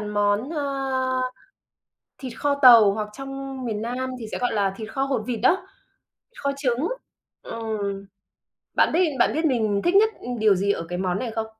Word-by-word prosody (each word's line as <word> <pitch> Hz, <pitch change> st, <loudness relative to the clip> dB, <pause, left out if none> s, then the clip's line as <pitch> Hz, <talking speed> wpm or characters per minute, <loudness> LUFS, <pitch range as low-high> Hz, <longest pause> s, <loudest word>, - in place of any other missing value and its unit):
món, 210 Hz, +4 st, 0 dB
ơ, 270 Hz, -4 st, -1 dB, 1.0 s
thịt 255 Hz, -3 st, -7 dB
kho 290 Hz, -1 st, +1 dB
tàu 230 Hz, -5 st, +9 dB
hoặc 210 Hz, 0 st, -3 dB
trong 270 Hz, +1 st, -7 dB
miền 215 Hz, -2 st, -3 dB
Nam 255 Hz, +3 st, -3 dB
thì 225 Hz, -, -6 dB
sẽ -, -, -2 dB
gọi 245 Hz, -2 st, 0 dB
là 200 Hz, -3 st, +1 dB
thịt 220 Hz, 0 st, -8 dB
kho 270 Hz, -, -1 dB
hột 270 Hz, -5 st, -1 dB
vịt 235 Hz, -3 st, -3 dB
đó, 365 Hz, +8 st, +3 dB, 0.7 s
kho 280 Hz, -, -1 dB
trứng. 265 Hz, +2 st, 0 dB, 0.5 s
Ừm, 205 Hz, -3 st, -4 dB, 0.7 s
bạn -, -, +3 dB
biết 335 Hz, -, +2 dB, 0.2 s
bạn -, -, +4 dB
biết 315 Hz, -, -1 dB
mình 220 Hz, -8 st, +1 dB
thích 350 Hz, -, +2 dB
nhất, 425 Hz, +2 st, +6 dB
ừm, 245 Hz, -1 st, -5 dB
điều 215 Hz, -2 st, +4 dB
gì 200 Hz, +2 st, +1 dB
ở 165 Hz, -, -5 dB
cái 180 Hz, 0 st, -4 dB
món 185 Hz, 0 st, -1 dB
này 235 Hz, +1 st, -3 dB
không? 220 Hz, 0 st, -2 dB
240 Hz, 185 wpm, -24 LUFS, 210-270 Hz, 1.0 s, tàu